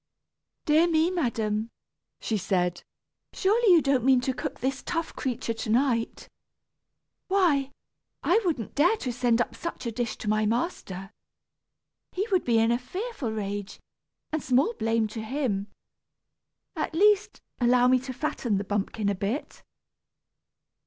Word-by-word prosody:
"Dear 315 +3 +4
me, 325 +1 +2
madam," 225 - -1 0.5
she 220 - -2
said, 180 -3 0 0.5
"surely 425 +2 +3
you 335 -3 +6
don't 275 -3 +2
mean 260 0 +5
to 260 +1 -1
cook - - -5
this 270 +1 -2
tough 330 -1 -3
creature 245 -3 -2
to 225 0 -5
night? 235 -1 +1 1.0
Why, 335 -9 +2 0.5
I 410 +6 +3
wouldn't 310 - -2
dare 345 +10 +3
to 250 - -3
send 240 -1 +2
up 240 - 0
such 335 -6 -6
a 235 - -1
dish 230 -1 -3
to - - -7
my 215 0 +2
master. 210 - -3 1.0
He 395 +4 -1
would 370 -2 +3
be 235 -2 +3
in 225 +1 +3
a 235 - +1
fearful 365 - -4
rage, 205 -1 -4 0.5
and 310 0 -1
small 265 - +2
blame 225 - 0
to 220 - -6
him. 220 -4 -2 1.1
At 315 0 -3
least, 415 +3 +3 0.2
allow 245 0 +4
me 255 0 +5
to 260 +1 -6
fatten 250 -5 -1
the 195 - -2
bumpkin 205 +1 -2
a 200 - +2
bit." 200 +9 -4
250 Hz, 145 wpm, -27 LUFS, 220-315 Hz, 1.1 s, you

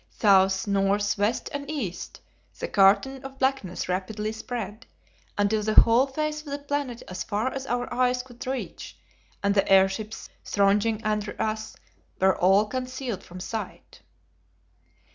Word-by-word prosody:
South, 190 -2 +3
north, 200 0 +1
west 210 +4 0
and 285 0 -5
east, 210 - -5 0.4
the - - -3
curtain 205 +8 +3
of 270 0 -9
blackness 265 -9 -1
rapidly 205 +4 -2
spread, 220 0 -6 0.5
until 205 +1 +2
the 215 +1 -1
whole 235 +4 +6
face 305 +2 -2
of 305 - -17
the 285 0 -3
planet 285 -4 -3
as 185 0 -5
far 225 +5 -1
as 270 0 -5
our 245 0 -2
eyes 250 0 +1
could 250 -1 -11
reach, 265 0 -5 0.5
and 200 0 +3
the 195 -1 +1
airships 195 +3 +2 0.2
thronging 210 +2 +2
under 210 -1 -2
us, 220 0 -2 0.4
were 190 0 +4
all 195 +4 +4
concealed 255 -2 -4
from 180 +1 -10
sight! 220 +3 -7
220 Hz, 145 wpm, -26 LUFS, 200-255 Hz, 0.5 s, whole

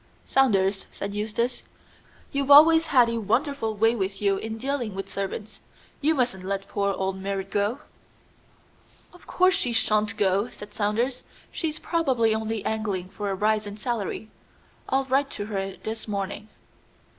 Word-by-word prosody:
"Saunders," 195 -7 +2
said 200 0 -5
Eustace, 220 +4 -2 0.7
"you've 280 -1 -1
always 320 +3 +8
had 250 -5 +5
a 230 0 -1
wonderful 225 +1 0
way 225 +2 +3
with 195 -2 -2
you 200 -1 +2
in 220 +2 -5
dealing 245 -4 -2
with 195 0 -5
servants. 200 +2 -5 0.4
You 310 +2 +3
mustn't 245 -8 0
let 195 +1 -3
poor 200 0 0
old 190 0 -2
Merrit 195 0 -4
go." 210 +6 0 1.3
"Of 355 - -17
course 370 +1 +3
she 245 -7 0
shan't 215 -1 +1
go," 200 +3 +2
said 205 0 -11
Saunders. 230 +5 -1 0.3
"She's 320 -4 -3
probably 265 -11 +1
only 220 -1 -2
angling 205 -5 -2
for 200 +1 -4
a 195 - -1
rise 210 +1 +1
in 205 0 -7
salary. 220 -1 -3 0.6
I'll 270 +1 +2
write 270 +2 +1
to 205 - -3
her 195 -2 -3
this 220 +1 -6
morning." 205 +1 -4
215 Hz, 155 wpm, -26 LUFS, 200-255 Hz, 1.3 s, always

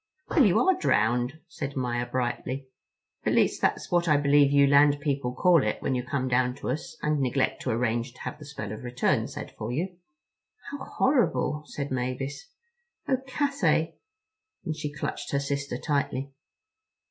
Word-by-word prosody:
"Well, 300 - +5
you 195 -6 +4
are 380 0 +4
drowned," 125 - +1
said 140 -4 -5
Maia 120 -2 -1
brightly. 130 +2 -2 0.6
"At - - +1
least - - +2
that's - - 0
what 175 -1 +2
I 150 -2 +5
believe 145 0 +4
you 140 0 +6
land 145 +1 +5
people 140 -4 -1
call 170 +5 +4
it 105 -3 -1
when 135 - -1
you 125 - 0
come 130 0 -2
down 125 0 +2
to 135 - -3
us 150 +5 -5
and 150 -1 +1
neglect 130 0 0
to - - -3
arrange 120 +1 0
to 130 - -15
have - - -5
the 150 - -10
spell 140 -8 -6
of 110 - -7
return 125 +1 +1
said - - -7
for - - -3
you." 175 +7 -3 0.7
"How 285 - -5
horrible," 245 - +1
said 140 -1 -5
Mavis. 130 +2 -3 0.6
"Oh, 260 - +3
Cathay," 260 - +1 0.7
and 160 -3 -2
she 150 -1 -4
clutched 145 0 -5
her 140 - +3
sister 140 -2 -2
tightly. 140 -1 -2
140 Hz, 170 wpm, -27 LUFS, 125-150 Hz, 0.7 s, you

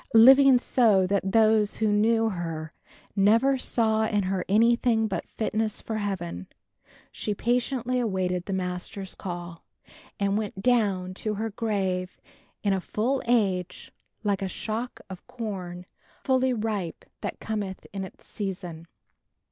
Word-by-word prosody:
Living 265 +3 +8
so 220 -6 +3
that 195 0 0
those 220 -1 +4
who 220 - +1
knew 225 +2 +3
her 165 -3 -5 0.4
never 230 +7 +4
saw 220 -3 +1
in 210 -2 +1
her 185 0 -1
anything 230 +1 +3
but 195 - -4
fitness 220 -1 -2
for 220 - -4
Heaven, 175 - -4 0.6
she 210 - -3
patiently 250 +2 0
awaited 185 -5 -1
the 195 - -3
Master's 185 +1 -4
call 175 -2 -7 0.6
and 200 +1 +1
went 205 -3 -5
down 200 -7 +2
to 210 +2 -3
her 220 +2 -3
grave 190 -4 -2 0.4
in 200 -2 +2
a 190 - 0
full 250 +9 -1
age 190 -6 0 0.3
like 200 -2 0
a 190 - -2
shock 225 +5 -4
of 190 -2 -10
corn 195 -8 -6 0.4
fully 260 -1 +2
ripe 210 -7 -3 0.2
that - - -4
cometh 205 -4 -4
in 195 -1 -3
its 190 - -11
season." 180 -5 -6
205 Hz, 135 wpm, -26 LUFS, 185-225 Hz, 0.6 s, Living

